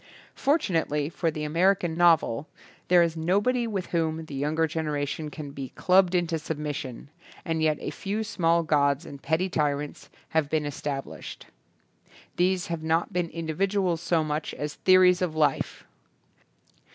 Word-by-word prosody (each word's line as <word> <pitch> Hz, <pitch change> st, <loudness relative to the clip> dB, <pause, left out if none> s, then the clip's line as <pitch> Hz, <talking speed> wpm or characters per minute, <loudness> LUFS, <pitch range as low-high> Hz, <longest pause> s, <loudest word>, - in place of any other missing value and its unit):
Fortunately 165 Hz, -, 0 dB
for 165 Hz, 0 st, -1 dB
the 155 Hz, -1 st, -4 dB
American 175 Hz, +3 st, +2 dB
novel 165 Hz, -6 st, +3 dB, 0.4 s
there 175 Hz, -1 st, +6 dB
is 165 Hz, -1 st, -1 dB
nobody 205 Hz, +9 st, +1 dB
with 195 Hz, -5 st, -3 dB
whom 160 Hz, -1 st, -1 dB
the 155 Hz, -, -10 dB
younger 150 Hz, +4 st, 0 dB
generation 150 Hz, -1 st, -3 dB
can 150 Hz, -2 st, -8 dB
be 135 Hz, -2 st, -6 dB
clubbed 185 Hz, 0 st, +4 dB
into 170 Hz, -2 st, 0 dB
submission, 150 Hz, -4 st, -5 dB, 0.3 s
and 165 Hz, -2 st, -1 dB
yet 155 Hz, -1 st, +2 dB
a -, -, -4 dB
few 205 Hz, +7 st, -3 dB
small 170 Hz, -5 st, +1 dB
gods 145 Hz, 0 st, +2 dB
and 140 Hz, -1 st, -10 dB
petty 160 Hz, +5 st, 0 dB
tyrants 150 Hz, -4 st, -2 dB, 0.2 s
have 160 Hz, -3 st, +1 dB
been 155 Hz, -1 st, 0 dB
es 145 Hz, -1 st, -6 dB
tablished. 140 Hz, -2 st, -5 dB, 0.9 s
These 180 Hz, 0 st, +2 dB
have 170 Hz, -2 st, -4 dB
not 165 Hz, +5 st, 0 dB
been 175 Hz, -1 st, 0 dB
indi 160 Hz, -1 st, -4 dB
viduals 190 Hz, -1 st, +1 dB
so 165 Hz, -1 st, +1 dB
much 150 Hz, 0 st, -3 dB
as 150 Hz, 0 st, -4 dB
theories 185 Hz, -1 st, +5 dB
of 170 Hz, -4 st, -1 dB
life. 150 Hz, -3 st, 0 dB
160 Hz, 150 wpm, -26 LUFS, 150-180 Hz, 0.9 s, there